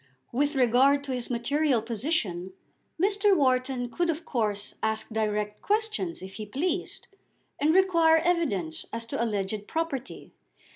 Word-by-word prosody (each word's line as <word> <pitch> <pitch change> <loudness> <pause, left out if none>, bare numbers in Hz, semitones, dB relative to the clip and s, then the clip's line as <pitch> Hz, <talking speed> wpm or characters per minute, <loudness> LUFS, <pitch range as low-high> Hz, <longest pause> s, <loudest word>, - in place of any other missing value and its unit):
With 285 +4 0
regard 265 +3 +4
to 275 - -5
his 250 -2 -4
material 260 +2 +1
position 215 - -2 0.5
Mr. 400 +1 +3
Wharton 255 -2 +1
could 345 +7 -1
of 330 +1 -2
course 210 -5 -2
ask 220 0 -1
direct 210 -1 -2
questions 420 - -1
if 190 0 -8
he 215 - -5
pleased, 280 - -2 0.5
and 300 +2 +3
require 335 -3 +5
evidence 315 - 0
as 230 0 -4
to 230 - -2
alleged 205 -1 -2
property. 320 -6 -4
255 Hz, 135 wpm, -27 LUFS, 220-325 Hz, 0.5 s, require